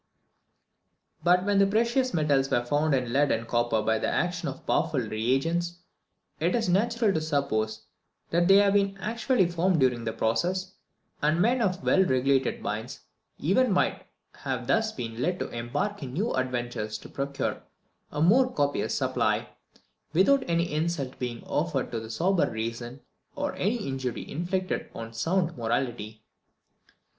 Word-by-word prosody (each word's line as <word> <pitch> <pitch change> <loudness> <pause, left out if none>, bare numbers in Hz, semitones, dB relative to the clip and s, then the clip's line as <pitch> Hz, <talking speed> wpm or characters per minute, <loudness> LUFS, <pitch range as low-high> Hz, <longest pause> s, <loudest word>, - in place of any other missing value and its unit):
But 180 +1 +4
when 205 -1 +3
the 195 - +5
precious 235 +5 +1
metals 145 -4 +2
were 120 0 +1
found 145 +3 +2
in 125 -2 -2
lead 145 +1 +3
and 115 +1 -1
copper 120 -2 +1
by 110 0 +1
the - - -1
action - - -1
of - - -9
powerful - - +1
re 110 0 -3
agents, 170 +6 0 0.6
it - - +1
was 230 -4 0
natural 220 +3 +2
to 160 - 0
suppose 125 -8 -1 0.5
that 175 +1 +3
they 195 - +7
had 200 0 +5
been 195 -1 +2
actually 225 +1 +1
formed 175 0 +1
during 125 -3 +2
the 110 - -2
process; 180 +14 -1 0.5
and 155 +3 +2
men 240 +6 +3
of 185 -3 0
well 190 - +4
regulated 135 -3 +1
minds 115 +6 -4 0.4
even 215 - +2
might 185 - 0 0.3
have - - -3
thus 220 -1 +2
been 115 - -6
led 180 +5 0
to - - -4
embark 120 - -3
in 130 -3 -6
new 205 - -1
adventures 120 -4 -2
to - - -12
procure 140 0 -3 0.5
a 150 - 0
more 250 +9 +5
copious 145 - 0
supply, - - 0 0.6
without 260 - +4
any 170 -1 +1
insult 155 -4 -2
being 120 -2 -4
offered - - -1
to 115 -1 -4
sober 175 +11 +1
reason, 115 +3 -5 0.3
or 285 0 -2
any 210 +1 -1
injury 130 -2 -3
inflicted 185 +4 -2
on 115 0 -7
sound 170 +7 0
morality. 115 -2 -3
155 Hz, 155 wpm, -27 LUFS, 120-190 Hz, 0.6 s, they